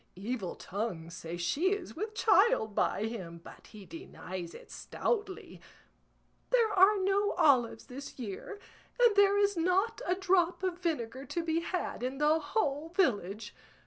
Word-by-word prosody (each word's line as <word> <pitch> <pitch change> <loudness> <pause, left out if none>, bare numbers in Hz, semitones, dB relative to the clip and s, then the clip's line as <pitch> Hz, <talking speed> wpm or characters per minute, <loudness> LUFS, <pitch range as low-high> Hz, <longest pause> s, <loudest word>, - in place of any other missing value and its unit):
Evil 200 -1 -4
tongues 180 -5 -5
say 165 0 -6
she 300 - +1
is 400 -3 -6
with 430 +5 -5
child 425 - +3
by 205 - 0
him, 185 -7 -6
but - - -14
he 210 -3 -12
denies 185 - -8
it - - -13
stoutly. 415 -5 -3 0.9
There 465 -4 +3
are 395 +2 +6
no 395 +2 +1
olives 245 -6 +3
this 275 +2 -9
year, 240 - -6 0.4
and 475 -4 +5
there 405 0 +5
is 405 0 +2
not 375 +8 +1
a 360 - +2
drop 365 -1 +1
of 365 -2 -2
vinegar 270 -7 -3
to 340 +2 -3
be 325 0 0
had 350 -4 -3
in 255 +2 -3
the 300 +2 +3
whole 295 -1 -1
village. 225 - 0
330 Hz, 150 wpm, -31 LUFS, -, 0.9 s, are